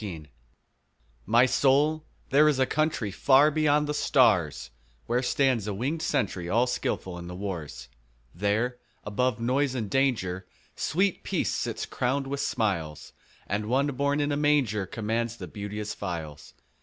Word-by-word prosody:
Peace 85 -7 -6 1.0
MY 120 +3 +5
soul, 140 +5 +2 0.3
there 150 +3 +6
is 145 - +1
a 130 - +3
country 155 -8 -1
Far 140 +8 +5
beyond 150 -1 +2
the 150 - -2
stars, 95 - +2 0.3
Where 120 +2 0
stands 130 -5 +1
a 105 - -2
wingèd 135 +11 -2
sentry 90 - -1
All 120 +5 +3
skilful 95 -7 -3
in 85 - -8
the 90 - -7
wars: 80 -10 -6 0.5
There, 110 +7 -1 0.2
above 120 +3 -1
noise 130 +3 0
and 110 -5 -3
danger, 105 -9 0 0.2
5 - - -38
Sweet 190 +2 0
Peace - - -1
sits - - -3
crown'd 135 +2 -1
with 140 +1 -4
smiles, 90 - -2 0.3
And 105 +2 -2
One 130 +4 +2
born 140 +2 0
in 145 0 0
a 145 - 0
manger 135 -10 +1
Commands 115 +3 -2
the - - -7
beauteous 105 0 -5
files. 80 -6 -6
120 Hz, 155 wpm, -27 LUFS, 100-140 Hz, 1.0 s, there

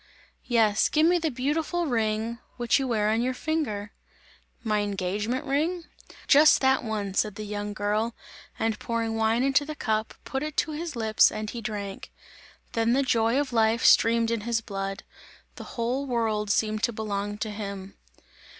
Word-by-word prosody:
"Yes, 220 -4 +3
give 310 +1 +3
me 350 +1 +4
the 320 -1 0
beautiful 305 +6 -1
ring, 225 -2 -1 0.2
which 240 +2 +2
you 270 - -1
wear 215 -3 +1
on 225 +1 +1
your 255 +1 -1
finger!" 250 -10 -2 0.7
"My 215 -2 +1
engagement 205 +4 -2
ring?" 320 +6 0 0.4
"Just 300 +2 +7
that 265 0 +3
one!" 210 -3 -3
said 210 +1 0
the 215 - -6
young 205 0 -4
girl 215 +3 -1 0.4
and 225 -1 -1
pouring 230 -1 -2
wine 225 +2 +2
into 275 +1 +3
the 305 +1 -6
cup, 220 -5 -2
put 265 - -3
it 305 0 -5
to 315 - +1
his 310 0 -5
lips 220 -2 +4
and 215 0 -4
he 235 - -6
drank. 205 -2 -6 0.6
Then 230 +1 +1
the 275 +2 +3
joy 230 0 +2
of 285 -3 -2
life 225 0 +2
streamed 230 0 +5
in 230 -2 -1
his 230 +1 0
blood; 195 -2 -5 0.5
the - - -9
whole 250 +4 -1
world 220 -4 0
seemed 215 +1 +1
to 235 - +1
belong 205 -2 -3
to 215 0 -3
him. 200 -2 -6
225 Hz, 170 wpm, -26 LUFS, 210-265 Hz, 0.7 s, Just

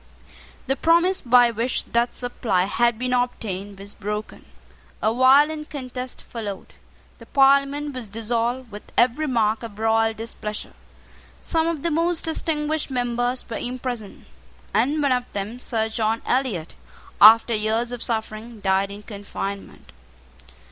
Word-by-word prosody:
The 270 - 0
promise 340 +6 +3
by 245 -1 +5
which 235 +3 -1
that 235 +1 0
supply 240 -6 0
had 235 +4 +1
been 250 +1 -2
obtained 205 -5 -2
was 200 +1 -8
broken. 210 +1 -5 0.5
A 220 - +1
violent 290 +5 +4
contest 255 -3 -6
followed. 210 -5 -7 0.5
The - - -13
Parliament 280 +1 +3
was 250 -5 -7
dissolved 230 +3 -2
with 205 +1 -8 0.2
every 255 +6 +3
mark 225 -4 +1
of 225 -3 -8
royal 225 0 +2
displeasure. 215 -1 -6 0.7
Some 325 -1 0
of 330 -4 -2
the 335 - 0
most 335 +2 +1
distinguished 315 -1 -1
members 245 0 -1
were 230 - -4
imprisoned; 245 -4 -5 0.5
and 295 +4 +2
one 280 - +2
of 250 -1 0
them, 205 +5 -4
Sir 225 -3 0
John 220 0 -1
Eliot, 245 -11 -1 0.5
after 225 +3 +8
years 220 +2 0
of 245 -1 -5
suffering, 220 0 -4
died 195 0 +1
in 205 +1 -9
confinement. 200 -1 -7
240 Hz, 135 wpm, -23 LUFS, 215-265 Hz, 0.7 s, after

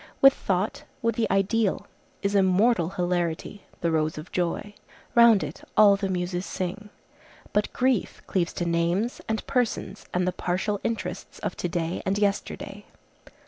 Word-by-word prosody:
With 275 0 +8
thought, 190 -2 -1 0.2
with 230 0 +2
the 230 - 0
ideal, 195 +2 +1 0.4
is 200 0 +1
immortal 190 -1 +3
hilarity, 175 +1 -2 0.2
the 170 - +1
rose 155 -1 0
of 155 +4 -8
joy. 180 +4 -2 0.4
Round 235 -4 +7
it - - -6 0.2
all 205 -2 +8
the 195 -1 -2
Muses 180 0 -2
sing. 190 +3 -4 0.6
But 210 - +1
grief 255 -4 0
cleaves 175 -3 0
to 175 - -2
names, 170 +7 0
and 220 0 -1
persons, 250 -4 -1
and 180 0 0
the - - +2
partial 185 +3 -1
interests 230 -1 -4
of - - -3
to 175 - -2
day 170 0 -2
and 190 +1 0
yesterday. 200 0 -2
195 Hz, 150 wpm, -26 LUFS, 175-210 Hz, 0.6 s, With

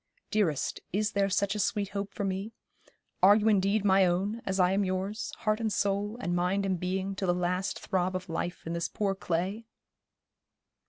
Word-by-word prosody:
Dearest, 190 -10 0
is 210 +2 0
there 200 -1 +1
such 200 +1 +1
a 210 - -3
sweet 205 -1 0
hope 200 0 -4
for 205 - -4
me; 195 +3 -3 0.7
are 200 +2 +8
you 215 0 +2
indeed 200 0 +3
my 195 -1 +5
own, 195 +6 0
as 195 0 0
I 180 0 +4
am 200 +1 +2
yours, 190 +3 -2
heart 215 0 +1
and 225 -2 -1
soul, 205 +2 0
and 175 -7 -1
mind 185 +3 +1
and 190 -2 0
being, 190 +2 -2
till 190 0 -3
the 175 - +3
last 180 +2 -1
throb 185 -1 -1
of 185 0 -4
life 175 +1 -4
in 165 - -3
this 170 0 -1
poor 200 -2 0
clay?' 190 +5 -2
195 Hz, 195 wpm, -29 LUFS, 185-205 Hz, 0.7 s, are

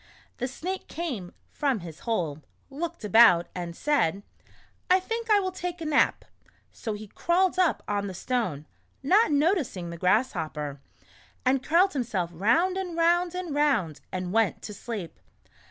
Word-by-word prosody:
The 250 - -2
Snake 365 +8 -5
came 255 - -4 0.2
from 275 -8 0
his 165 -2 -9
hole, 165 -10 -2 0.3
looked 335 +1 -5
about, 210 -5 +6
and 175 -2 -5
said: 200 - +1 0.7
"I 370 +1 +6
think 455 +4 -4
I 420 -1 +6
will 375 -1 -2
take 355 -1 -5
a 325 - -5
nap." 305 -2 +2 0.5
So 220 - -5
he 210 +1 -7
crawled 360 - +1
up 360 -3 +2
on 200 -1 -1
the 190 - -6
stone 185 - -2 0.4
(not 390 +8 +4
noticing 285 - +1
the 170 - -7
Grass 210 +8 +3
hopper) 150 -5 -5 0.6
and 260 +1 +3
curled 345 +7 +3
himself 215 - -2
round 245 - +2
and 360 -3 -4
round 345 +1 +2
and 360 -4 -4
round 270 - +1
and 185 0 -3
went 225 -3 +1
to 210 - -6
sleep. 205 -4 -6
250 Hz, 155 wpm, -27 LUFS, -, 0.7 s, about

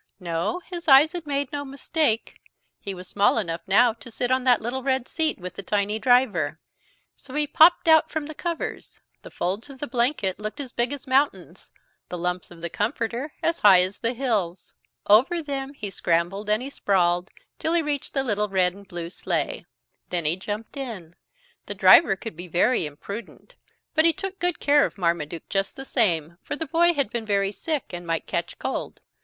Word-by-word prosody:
No, 175 - -2
his 345 -2 -8
eyes 285 +3 +7
had 340 -3 -6
made 280 -2 -2
no 285 -1 -3
mistake. 275 -3 -1 0.4
He 195 -1 -6
was 180 0 -9
small 205 +3 +2
enough 170 -6 -2
now 225 +4 +5
to 235 +2 -12
sit 245 +2 -2
on 260 0 +2
that 245 -3 +5
little 245 +4 -3
red 260 -1 0
seat 320 -1 0
with 180 -1 -7
the - - -6
tiny 205 +2 -1
driver. 210 - +2 0.6
So 265 - -11
he 300 0 +2
popped 325 +4 +5
out 320 -1 +6
from 315 -1 -3
the 310 - -7
covers. 335 +2 -5 0.2
The - - -11
folds 195 +9 -3
of 275 - -11
the 290 - -4
blanket 235 -6 0
looked 215 +7 -6
as 265 -4 -5
big 240 +2 0
as 285 -1 -6
mountains, 270 +2 -1 0.4
the 180 - -5
lumps 180 +1 -3
of 170 -1 -14
the 170 - -4
comforter 235 +5 -2
as 335 0 +1
high 190 -3 +7
as 185 +2 -3
the 230 +1 0
hills. 210 -9 -2 0.3
Over 265 +11 +4
them 275 -1 -4
he 205 -6 -5
scrambled 175 +4 -1
and 215 +3 +2
he 275 - -6
sprawled 180 -4 +1 0.3
till 320 - -1
he 340 -1 +2
reached 290 -1 -3
the 270 - +2
little 210 -4 0
red 185 -2 +2
and 200 0 -15
blue 170 -1 -6
sleigh. - - -2 0.4
Then 175 -3 -1
he 155 +3 +3
jumped 210 +7 -6
in. 215 -12 -6 0.5
The - - -4
driver 200 -13 +7
could 220 +1 -8
be 175 +2 -8
very 175 +2 +2
impudent, 200 +10 -9 0.4
but 315 0 +3
he 335 - +5
took 390 +1 -6
good 355 -1 -1
care 290 0 +4
of - - -3
Marmaduke 170 -3 -2
just 195 0 -1
the 270 - -8
same, 170 - +1
for - - -4
the 320 - -4
boy 340 +3 +3
had 280 -7 0
been 230 -2 -4
very 200 -1 +1
sick 280 - -4
and 175 0 -7
might 165 -1 -1
catch - - -3
cold. - - -4
230 Hz, 200 wpm, -24 LUFS, 185-285 Hz, 0.6 s, eyes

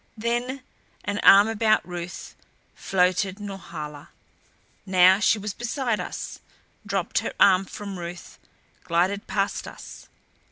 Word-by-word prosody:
Then, 240 +4 -2 0.4
an 205 0 -2
arm 200 +2 +7
about 220 -2 +2
Ruth, 175 0 -7 0.4
floated 185 +1 0
Norhala. 165 -8 -8 0.7
Now 185 0 +5
she 215 - +3
was 205 -1 -5
beside 240 -1 -2
us; - - -6 0.5
dropped - - 0
her - - -4
arm 190 -1 +5
from 200 0 -7
Ruth; 175 +1 -8 0.4
glided 185 +5 0
past 200 0 -1
us. - - -11
195 Hz, 115 wpm, -25 LUFS, 180-215 Hz, 0.7 s, arm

